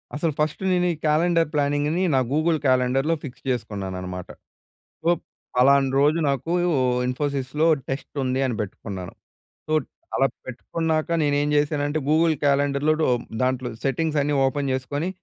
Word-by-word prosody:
అసలు 155 +2 0
ఫస్టు 150 +4 -1
నేను 180 -1 +2
ఈ - - -6
క్యాలెండర్ 165 +2 +3
ప్లానింగ్‌ని 145 +4 +1
నా - - +4
గూగుల్ 155 +2 +2
క్యాలెండర్‌లొ 130 +5 +2
ఫిక్స్ 130 -2 -9
చేసుకున్నానన్నమాట. 95 -6 -4 0.8
ఒప్ 175 - -1 0.3
ఫలానా 135 +2 +5
రోజు 150 +3 +3
నాకూ 140 +5 -1 0.5
ఇన్ఫోసిస్‌లొ 140 +3 -1 0.2
టెస్టుంది 135 -1 -2
అని 125 -3 -1
పెట్టుకున్నాను. 95 -2 -6 0.5
సో 155 - -3 0.4
అలా 135 - +4 0.2
పెట్టుకున్నాక, 155 +5 -2
నేను 145 -1 +2
ఏం 145 - 0
చేశానంటే 145 0 +1
గూగుల్ 160 +1 +4
క్యాలెండర్‌లో 140 +1 +2
డో 155 - +3 0.4
దాంట్లో 130 -1 0 0.2
సెట్టింగ్స్ 150 +3 0
అన్నీ 145 +1 0
ఓపెన్ 140 +1 -1
జేసుకొని, 145 +5 -2
145 Hz, 130 wpm, -24 LUFS, 130-155 Hz, 0.8 s, ఫలానా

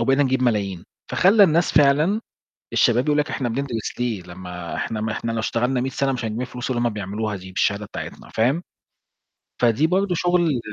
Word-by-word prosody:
وبقينا 135 +4 +3
نجيب 130 -1 +1
ملايين، 100 -7 0 0.3
فخلَّى 195 - +6
الناس 170 0 +2
فعلًا، 150 +8 +4 0.5
الشباب 120 +2 +3
يقولوا 150 0 +3
لك - - -9
إحنا 125 - -2
بندرس 120 -2 -3
ليه؟ 115 -6 -1
لمّا 90 -1 -8
إحنا 110 - -3
م 110 +1 -2
إحنا 115 +2 -3
لو 115 - -2
اشتغلنا 125 +3 0
100 130 - -1
سنة 135 +1 0
مش 125 -2 -3
هنجيب 110 +1 -3
الفلوس 125 0 -5
اللي 120 -2 0
هم 120 - +2
بيعملوها 105 +1 -3
دي 95 0 -10
بالشهادة 100 +2 0
بتاعتنا، - - -8
فاهم؟ 130 +10 +2 1.0
فدي 120 +5 +3
برضه 185 +1 +1
شغل 170 -5 +2
125 Hz, 185 wpm, -22 LUFS, 110-145 Hz, 1.0 s, فخلَّى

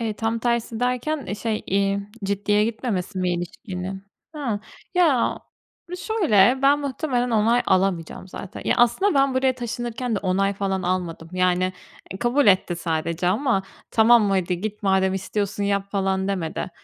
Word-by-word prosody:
Eee, 225 -2 -1
tam 225 +2 -1
tersi 235 -1 -1
derken, 250 +4 -1
eee, 200 - -3
şey, 220 0 -2
eee, 195 +1 +1 0.2
ciddiye 205 +1 +1
gitmemesi 215 -4 -3
mi 180 -1 +1
ilişkinin? 185 +1 -6 0.3
Hıı. 235 -9 -2 0.3
Ya, 315 -9 +3 0.6
şöyle 265 - +3
ben 280 +1 +5
muhtemelen 260 -3 -1
onay 230 +2 +3
alamayacağım 185 -1 0
zaten. 185 0 -8
Ya - - +2
aslında 280 - +3
ben 275 -1 +3
buraya 260 0 +3
taşınırken 240 0 -3
de 205 - 0
onay 195 +1 +1
falan 190 -1 -2
almadım 175 -3 -2
yani, 185 0 +1 0.4
eee, 190 - -7
kabul 245 +2 +2
etti 185 -2 +3
sadece 165 +1 -2
ama 215 0 +1 0.3
"Tamam 220 -2 +5
hadi 180 -2 0
git, 210 0 -5
madem 190 -1 +2
istiyorsun 200 +1 -2
yap." 200 0 -1
falan 190 -1 0
demedi. 185 -1 -3
205 Hz, 150 wpm, -23 LUFS, 190-240 Hz, 0.6 s, ben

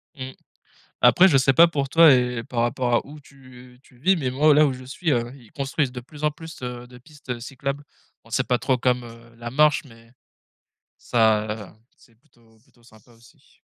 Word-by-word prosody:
Mmh. 130 -1 -7 0.7
Après 190 +1 +6
je 145 - +3
sais 135 +1 +3
pas 170 +6 +6
pour 140 -4 -2
toi 165 0 +7
et 125 -2 +1
par 120 -2 -4
rapport 120 +1 -1
à - - 0
où 150 +2 -12
tu 130 -3 -17
tu 125 -3 -23
vis 185 +8 +2
mais 135 -6 -2
moi, 145 +4 +4
là 150 +1 +5
où 140 - -1
je 130 0 -10
suis, 155 +5 -3
heu, 120 -2 -1
ils 120 -6 -18
construisent 140 -1 -2
de 125 - -7
plus 150 +5 -11
en 150 - +3
plus, 160 0 -12
heu, 125 0 -6
de 125 0 -15
pistes, 145 0 -15
heu, 120 -1 -4
cyclables. 140 +3 -5 0.4
Bon 115 - -20
c'est 130 +4 -1
pas 125 - +2
trop 130 0 0
comme, 125 0 0
heu, 115 0 -14
la 120 0 -7
marche 150 +4 +3
mais 115 -2 -18 0.9
ça 110 -3 0 0.2
c'est 115 -3 -25
plutôt 115 -3 -28
plutôt 120 -2 -29
sympa 110 0 -21
aussi. 115 +1 -24
125 Hz, 210 wpm, -23 LUFS, 120-145 Hz, 0.9 s, toi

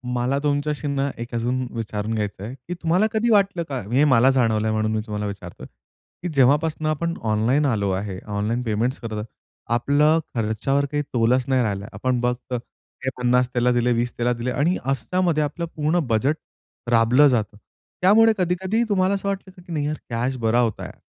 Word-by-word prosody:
मला 125 +3 0
तुमच्याशी 145 0 -1
ना 140 0 0
एक 120 0 -7
अजून 125 +2 -1
विचारून 110 -1 -3
घ्यायचं 105 -3 -3
आहे, 115 +5 -6
कि 135 +7 -8
तुम्हाला 175 +3 +1
कधी 225 +1 +1
वाटलं 195 -4 +3
का? 135 -2 -2
हे 135 +4 +4
मला 130 -2 +5
जाणवलंय 110 -4 +1
म्हणून 110 0 0
मी 110 - 0
तुम्हाला 105 -1 -4
विचारतोय, 100 -4 -7 0.6
कि 180 - -2
जेव्हापासून 150 +4 +3
आपण 170 +2 -1 0.2
ऑनलाईन 120 +8 +2
आलो 105 -7 +1
आहे. 95 0 -3
ऑनलाईन 105 +4 -1
पेमेंट्स 115 +3 -1
करत 110 -3 -4 0.5
आपलं 145 +7 +3 0.2
खर्चावर 115 +5 0
काही 145 0 0
तोलच 125 +2 +3
नाही 130 -2 +2
राहिलं. 100 -2 -2
आपण 125 +5 -1
फक्त 125 +1 -2 0.5
हे - - +2
50 125 0 +2
त्याला 125 0 +2
दिले, 120 0 +2
20 120 +1 -1
त्याला 120 +1 +1
दिले 120 +1 -3
आणि 155 +8 +1
अशामध्ये 155 +5 0
आपलं 170 +4 -3
पूर्ण 155 +3 +1
बजेट 125 +6 +1 0.6
राबलं 120 +5 +5
जातं. 110 -5 0 0.4
त्यामुळे 220 +4 +6
कधी-कधी 190 +5 0
तुम्हाला 190 -1 +2
असं 200 0 -4
वाटलं, 190 -1 -5
की 175 - -13
नाही 150 -2 -1
यार 155 +1 -2
कॅश 120 +3 -1
बरा 115 +1 +2
होता 115 -4 0
यार. - - -10
125 Hz, 180 wpm, -23 LUFS, 115-155 Hz, 0.6 s, त्यामुळे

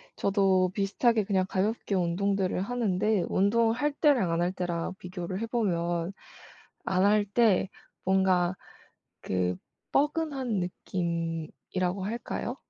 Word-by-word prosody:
저도 190 -2 +2
비슷하게 215 +3 +2
그냥 190 -2 +1
가볍게 205 +2 -1
운동들을 185 +2 0
하는데 210 -3 0
운동을 225 +4 +3
할 295 +5 0
때랑 280 - +3
안 165 +1 +1
할 175 +1 +1
때랑 175 -2 -3
비교를 180 +1 -5
해 - - 0
보면 175 -6 -1 0.7
안 185 +1 +2
할 210 +1 +4
때 205 -2 +3 0.3
뭔가 185 -1 +2 0.7
그 90 -1 -1 0.4
뻐근한 285 - 0
느낌이라고 175 +1 -3
할까요? 235 +3 -4
190 Hz, 240 characters per minute, -28 LUFS, 180-220 Hz, 0.7 s, 할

